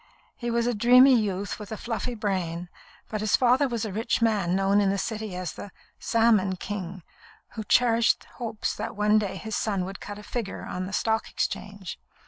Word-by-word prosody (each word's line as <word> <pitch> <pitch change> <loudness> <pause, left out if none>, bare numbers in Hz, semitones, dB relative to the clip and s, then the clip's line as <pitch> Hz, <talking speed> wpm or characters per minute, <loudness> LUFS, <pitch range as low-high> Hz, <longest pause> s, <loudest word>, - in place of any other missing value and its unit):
He 240 - -4
was 235 0 +1
a 245 - +1
dreamy 250 +5 +7
youth 205 -4 0
with 210 -1 -9
a 220 - -4
fluffy 240 +2 -3
brain, 180 -5 -2 0.4
but 215 -1 -3
his 215 - +3
father 255 +3 +4
was 235 -3 -2
a 205 - -5
rich 225 +3 0
man 210 -6 +2
known 195 +1 +3
in 200 - +2
the 200 - 0
City 215 -2 -4
as 180 -1 -4
"the 205 - -9 0.3
Salmon 220 -5 +3
King," 185 -2 -6 0.5
who 220 - -6
cherished 230 +2 +3
hopes 225 -3 -3
that - - -5
one 210 +1 +4
day 200 -3 -3
his 220 +3 -5
son 195 -4 -1
would 195 +1 -7
cut 205 0 -7
a 210 - -10
figure 220 -1 -4
on 185 0 -4
the 200 - -8
Stock 220 +1 0
Exchange. 200 -3 -4
210 Hz, 195 wpm, -26 LUFS, 195-230 Hz, 0.5 s, dreamy